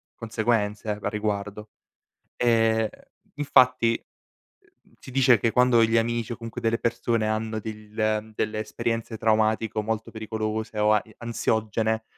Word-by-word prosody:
conseguenze 110 -2 -1
a 105 0 -2
riguardo. 105 0 -3 0.7
Ehm, 110 -2 +2 0.5
infatti, 130 -5 +4 0.6
uhm, - - -29 0.2
mhmm, - - -26
si - - -11
dice 125 -3 +5
che 115 +3 +1
quando 125 -2 +5
gli 115 +1 0
amici 115 0 0
o - - -6
comunque 115 +1 -7
delle 115 -1 +1
persone 115 -1 0
hanno 110 0 -1
dell 105 0 -9
ehm, 110 0 0
delle 110 0 -1
esperienze 115 +1 -3
traumatico 110 0 +1
molto 110 +1 -3
pericolose 110 0 -4
o 105 0 +4
a 105 -1 +4
e - - -18
ansiogene 110 -1 -1
110 Hz, 145 wpm, -25 LUFS, 110-115 Hz, 0.7 s, dice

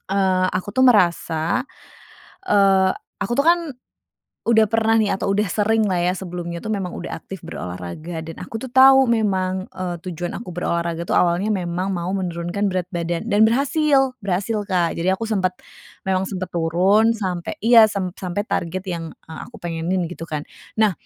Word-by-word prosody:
eee 190 -1 +2
aku 190 +2 -4
tuh 260 - 0
merasa 175 - +2 0.8
eee, 195 - +4 0.2
aku 205 +3 -2
tuh 280 - +3
kan 340 +3 +5 0.9
udah 220 -1 +4
pernah 225 +1 +2
nih, 215 - +2
atau 195 - -1
udah 205 +1 +1
seringlah 210 -2 +1
ya, 180 - +2
sebelumnya 175 -2 -5
itu 215 - -8
memang 195 -4 -2
udah 175 - -6
aktif 195 - -9
berolahraga 90 - -6
dan 165 - -7
aku 225 +4 -6
tuh 260 - -6
tahu 265 +1 +6
memang, 190 -5 0
eee, 180 -1 -4
tujuan 175 -1 -5
aku 215 -4 -7
berolahraga 170 -1 -2
itu - - +1
awalnya 175 +3 +2
memang 185 -1 -1
mau 175 +1 -3
menurunkan 180 +1 -2
berat 185 -2 -1
badan 170 -1 -2
dan 210 +2 +5
berhasil, 275 +2 +2
berhasil, 205 +1 -2
Kak. 175 -3 0
Jadi 170 - -1
aku 210 - -6
sempet, 190 -5 0 0.5
memang 190 0 0
sempet 185 -2 -5
turun 185 +7 +3
sampai 185 -5 -3
iya, 230 -1 +7
sem 195 -3 -3
sampai 185 +2 -2
target 185 -3 -3
yang 170 -4 -5
e 160 - -14
aku 235 +9 -9
pengenin, 170 +1 -2
gitu 165 -1 -7
kan. 150 -2 -4 0.3
Nah, 215 -2 +3
190 Hz, 170 wpm, -21 LUFS, 175-215 Hz, 0.9 s, iya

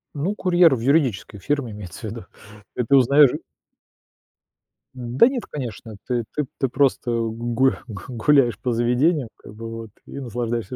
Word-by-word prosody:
Ну, 175 +9 -2
курьер 175 -6 +4
в - - -5
юридической 125 -6 0
фирме, 140 -1 -2
имеется 100 -5 -9
в - - -18
виду, 110 -3 -8 0.5
и 125 - 0
ты 140 +4 +3
узнаёшь 140 +1 +6
ы - - -4 1.6
Н 120 0 -6
да 235 - +8
нет, 260 -3 -2
конечно, 115 -5 -7
ты 120 -2 0
ты 150 -2 0
ты 135 - +1
просто 135 -2 +1
гурх 115 +3 0
гу 100 -4 -8
гуляешь 125 0 +2
по 125 - -2
заведению, 125 +4 +1
как 100 - -13
бы, 115 +1 -7
вот, 115 -1 -7 0.2
и 140 - -8
наслаждаешься 120 -2 -3
125 Hz, 165 wpm, -22 LUFS, 115-140 Hz, 1.6 s, да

